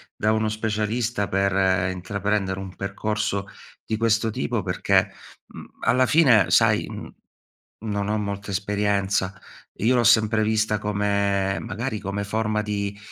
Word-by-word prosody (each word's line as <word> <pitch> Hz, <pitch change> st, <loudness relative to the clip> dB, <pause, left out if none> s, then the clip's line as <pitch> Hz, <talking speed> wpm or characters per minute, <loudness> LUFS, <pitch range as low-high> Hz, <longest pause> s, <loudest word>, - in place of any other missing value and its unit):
da 105 Hz, -, +1 dB
uno 110 Hz, 0 st, 0 dB
specialista 110 Hz, 0 st, -1 dB
per 95 Hz, -1 st, +1 dB
intraprendere 95 Hz, +1 st, -2 dB
un 95 Hz, -1 st, -8 dB
percorso 100 Hz, 0 st, -2 dB, 0.4 s
di 110 Hz, -, -2 dB
questo 115 Hz, 0 st, +2 dB
tipo 70 Hz, -8 st, -2 dB
perché, -, -, +1 dB, 0.4 s
mhmm, -, -, -11 dB, 0.2 s
alla 130 Hz, +1 st, +3 dB
fine 120 Hz, -, +5 dB
sai, -, -, +4 dB
mhmm, -, -, -8 dB, 0.8 s
non 100 Hz, -1 st, -2 dB
ho 110 Hz, -, +1 dB
molta 100 Hz, -1 st, -4 dB
esperienza. 100 Hz, 0 st, -1 dB, 0.4 s
Io 120 Hz, +5 st, +2 dB
l'ho 120 Hz, -, +3 dB
sempre 110 Hz, 0 st, +4 dB
vista 110 Hz, -1 st, +1 dB
come 100 Hz, -1 st, 0 dB
magari 110 Hz, +3 st, -4 dB
come 100 Hz, +1 st, -3 dB
forma 105 Hz, +1 st, -1 dB
di 100 Hz, -1 st, -3 dB
105 Hz, 135 wpm, -24 LUFS, 100-110 Hz, 0.8 s, fine